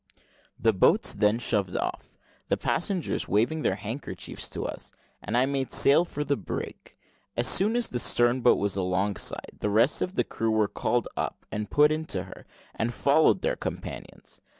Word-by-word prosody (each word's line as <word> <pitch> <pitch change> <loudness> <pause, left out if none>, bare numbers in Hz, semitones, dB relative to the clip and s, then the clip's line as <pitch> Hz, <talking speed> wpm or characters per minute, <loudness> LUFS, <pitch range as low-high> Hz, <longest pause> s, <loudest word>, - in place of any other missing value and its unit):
The 115 - +2
boats 95 - +3
then 105 +1 +2
shoved 100 -6 0
off, - - -5 0.3
the - - +1
passengers 180 0 -1
waving 120 +10 +1
their 95 - +1
handkerchiefs 110 +7 -5
to - - -4
us, - - -5 0.3
and - - -2
I 125 - +4
made 135 -1 -2
sail 145 +5 +5
for 150 -3 -4
the 145 -1 0
brig. 100 - -7 0.4
As 120 - +2
soon 210 +5 +3
as 240 -1 +1
the 125 - -2
stern 120 +2 +3
boat 120 - +5
was 100 -1 0
alongside, 95 +1 -2
the 105 - -1
rest 115 +7 +3
of 185 - -2
the - - +2
crew 115 - -3
were 110 -1 +2
called 120 +2 -1
up - - -4
and 105 0 -4
put 150 +1 +4
into 155 +1 -2
her, - - -13 0.3
and 115 +1 -2
followed 140 - +3
their - - +1
companions. - - -7
120 Hz, 175 wpm, -27 LUFS, 105-150 Hz, 0.4 s, sail